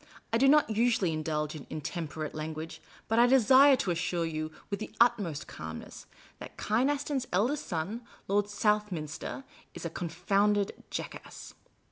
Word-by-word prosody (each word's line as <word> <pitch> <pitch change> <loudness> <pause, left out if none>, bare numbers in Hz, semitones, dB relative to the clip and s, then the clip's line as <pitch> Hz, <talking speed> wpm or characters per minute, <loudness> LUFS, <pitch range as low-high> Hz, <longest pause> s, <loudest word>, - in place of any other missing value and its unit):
I 230 - +4
do 270 - +5
not 295 -4 +5
usually 220 -6 +2
indulge 155 -1 -2
in 150 - -9
intemperate 155 0 -4
language; 155 +1 -6 0.3
but 225 +1 +2
I 240 - +7
desire 265 +2 +7
to 195 -7 -1
assure 170 0 -1
you, 155 -1 -3 0.2
with 200 - -1
the 215 - -6
utmost 215 -11 +2
calm 80 0 -7
ness, - - -11 0.3
that - - -10
Kynaston's 265 +3 0
eldest 240 +11 +1
son, 185 +7 -3 0.3
Lord 205 +1 +2
Southniinster, 205 - -1 0.3
is - - -7
a 170 - -3
con 170 0 -4
founded 200 +4 +2 0.2
jackass." - - -7
200 Hz, 150 wpm, -30 LUFS, 160-235 Hz, 0.3 s, I